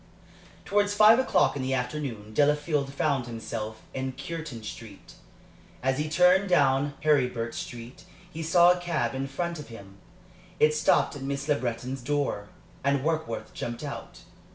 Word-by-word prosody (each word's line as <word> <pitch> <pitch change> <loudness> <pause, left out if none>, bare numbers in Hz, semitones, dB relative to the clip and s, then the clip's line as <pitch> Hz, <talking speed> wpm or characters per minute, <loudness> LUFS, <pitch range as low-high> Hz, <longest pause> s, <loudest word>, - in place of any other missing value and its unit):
Towards 205 0 +1
five 215 +3 +7
o'clock 260 - +2
in 140 - -3
the 130 +1 0
afternoon, 125 -5 -4
Delafield 145 +1 +1
found 140 -3 0
himself 110 -1 -6
in 130 0 -3
Cureton 140 -3 -6
Street. 105 -2 -10 0.7
As 130 +1 +1
he 150 +1 -1
turned 180 +4 +4
down 140 -3 +3
Heribert 125 -6 +1
Street 120 +1 -8 0.3
he 165 - -6
saw 175 +2 +6
a 180 - 0
cab 175 -4 -1
in 135 +1 -3
front 170 +4 -3
of 150 - -8
him. 100 -4 -12 0.6
It 150 0 +5
stopped 155 0 +2
at 145 - -8
Miss 140 +1 -3
Le 150 - +4
Breton's 125 0 -3
door, 135 -6 -2 0.3
and 140 -1 +1
Warkworth 160 -6 -2
jumped 120 +4 -5
out. 145 -2 -7
140 Hz, 155 wpm, -27 LUFS, 125-155 Hz, 0.7 s, five